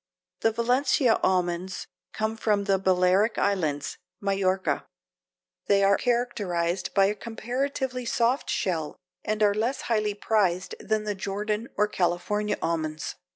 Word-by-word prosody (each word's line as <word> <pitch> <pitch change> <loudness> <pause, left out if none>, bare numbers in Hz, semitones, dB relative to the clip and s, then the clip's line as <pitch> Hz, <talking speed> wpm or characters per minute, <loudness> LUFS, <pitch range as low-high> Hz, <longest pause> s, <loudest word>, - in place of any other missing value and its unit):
The 225 - +2
Valencia 245 +1 +2
almonds 180 0 0 0.3
come 220 +1 -2
from 210 -2 +1
the 195 -1 +2
Balearic 185 +3 +3
islands 155 -8 0 0.2
(Majorca); 195 -1 0 0.8
they 200 0 +4
are 200 0 +5
characterized 195 -8 -1
by 195 -1 +6
a 200 - +2
comparatively 250 +3 -3
soft 235 +3 +1
shell 160 -5 -1 0.3
and 215 0 0
are 205 -1 +5
less 230 +6 -1
highly 215 -3 0
prized 195 -4 +1
than 215 -1 -1
the 210 -1 -1
Jordan 210 +3 -3
or 210 - +4
the 210 - -11
California 190 +4 0
almonds. 155 -2 -2
205 Hz, 130 wpm, -26 LUFS, 185-225 Hz, 0.8 s, by